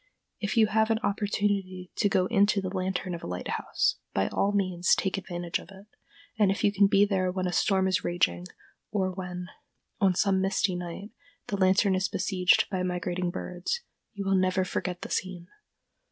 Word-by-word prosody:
If 210 +2 -2
you 220 - +7
have 220 +1 +2
an 225 - +3
opportunity 200 -3 -1
to 205 - +2
go 185 -1 +2
into 205 0 +3
the 190 0 -4
lantern 185 0 -2
of 170 - -5
a - - -7
lighthouse, 90 0 -1 0.2
by 95 - +1
all 200 - +1
means 185 -3 +2
take 190 - -1
advantage 175 -3 -3
of - - -14
it; 195 0 -13 0.5
and 205 -2 +5
if 195 - -1
you 205 - +3
can 200 0 +5
be 200 0 +5
there 190 -3 0
when 185 0 -2
a 180 - -1
storm 190 0 +2
is 190 +2 +1
raging, 90 - 0 0.4
or 190 -3 0
when, 180 -1 -6 0.5
on 190 -2 +3
some 190 0 +2
misty 195 0 +1
night, 180 +4 -6 0.4
the 205 - 0
lantern 190 +1 +3
is 190 +1 +1
besieged 185 -1 +2
by 185 -2 -1
migrating 180 0 -2
birds, 180 - -4 0.3
you 200 -1 -4
will 195 - +2
never 185 0 +2
forget 180 -1 -3
the - - -7
scene. 185 -2 -3
190 Hz, 185 wpm, -28 LUFS, 180-200 Hz, 0.5 s, you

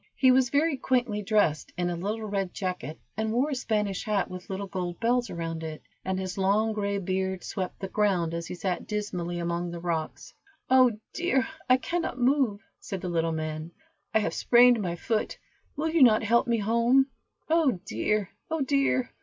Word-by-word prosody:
He 260 -1 +5
was 255 -1 +4
very 290 +2 +2
quaintly 245 -5 0
dressed, 205 -8 +1
in 175 0 0
a - - -2
little 210 +6 -3
red 195 -3 -2
jacket, 180 -6 -4 0.2
and 220 +1 -1
wore 260 +6 +1
a - - 0
Spanish 210 -6 -1
hat 205 -4 0
with 180 0 -8
little 195 +1 -3
gold 180 -3 -4
bells 240 +1 +1
around 165 -1 -4
it, 155 -1 -6 0.2
and 190 0 -1
his 185 0 -4
long 210 +3 +2
gray 200 -1 -1
beard 190 0 -2
swept 185 -3 -4
the 195 - -4
ground, 185 -5 +1
as 170 0 -4
he - - -5
sat 180 0 -3
dismally 180 -5 -3
among 170 0 -2
the 170 0 -6
rocks. 165 -2 -3 0.4
"Oh, 255 -4 +5 0.2
dear! 335 -7 +1 0.2
I 255 - +7
cannot 335 0 -2
move," 250 -5 +2 0.2
said 195 -3 -6
the 180 - -3
little 165 -1 0
man; 155 +1 -4 0.4
"I - - +3
have 215 - 0
sprained 245 -1 +5
my 175 -3 -2
foot, 215 +5 -2 0.4
will 315 +2 -1
not 250 -9 +6
you - - -2
help 235 +4 +3
me 235 -1 +2
home? 235 +5 +3 0.4
Oh 315 - +2
dear! 210 -2 -1 0.2
oh 320 -1 -1
dear!" 275 -2 +1
205 Hz, 185 wpm, -27 LUFS, 180-245 Hz, 0.4 s, I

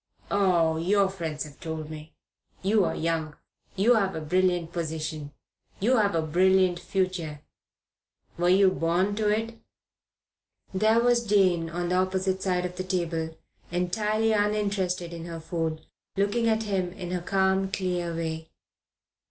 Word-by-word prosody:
"Oh, 175 -5 +3
your 195 +4 +2
friends 165 -5 -4
have 150 -2 -12
told 160 -1 -5
me. 155 +1 -10 0.5
You 200 0 +3
are - - -1
young. 160 -2 -2 0.4
You 210 +5 +4
have 195 -4 +1
a - - -2
brilliant 175 +1 +1
position. 155 -3 -4 0.5
You 245 +6 +3
have 205 -5 +2
a 165 - +1
brilliant 185 +2 +3
future. 180 -6 -2 0.9
Were 175 +2 +1
you 190 +1 +5
born 175 +4 +1
to 215 -1 +1
it?" 225 +2 -1 1.1
There 215 +4 +3
was 240 0 +3
Jane 185 -5 +3
on 175 +1 -3
the 180 - +2
opposite 190 0 0
side 180 -2 0
of 180 0 -6
the 185 - -2
table, 165 -3 -2 0.3
entirely 210 +5 0
uninterested 200 -4 0
in 165 0 -7
her 165 -1 -6
food, 160 -1 -3 0.3
looking 205 +4 +1
at 220 0 +1
him 190 -4 -1
in 180 -3 -6
her 180 -1 -1
calm, 190 +1 +1
clear 180 -3 -2
way. 160 -1 -4
180 Hz, 145 wpm, -27 LUFS, 165-195 Hz, 1.1 s, you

